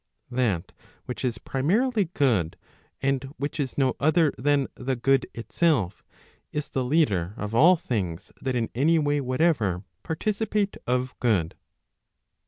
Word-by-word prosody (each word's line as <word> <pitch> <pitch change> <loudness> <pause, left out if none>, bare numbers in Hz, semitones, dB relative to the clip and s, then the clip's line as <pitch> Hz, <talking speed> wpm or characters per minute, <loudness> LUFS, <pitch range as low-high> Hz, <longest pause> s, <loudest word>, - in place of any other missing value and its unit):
That 115 -9 0 0.3
which 125 - -5
is 120 -3 -1
primarily 205 - +1
good, 110 - +2 0.5
and 135 -1 +1
which 145 +2 -4
is 135 -3 -2
no 130 -3 +2
other 155 +1 +3
than 145 +1 +2
the 130 +1 -2
good 135 +2 +2
itself 115 - 0 0.5
is 150 0 -3
the 130 - -1
leader 105 - +1
of 105 +1 -4
all 165 +10 +7
things 95 - -3
that 130 -1 -1
in 115 -2 -1
any 155 +7 +3
way 145 -2 +1
whatever 130 - +1 0.2
participate 205 +4 -1
of 125 +1 0
good. 100 -9 +1
130 Hz, 135 wpm, -26 LUFS, 115-155 Hz, 0.5 s, all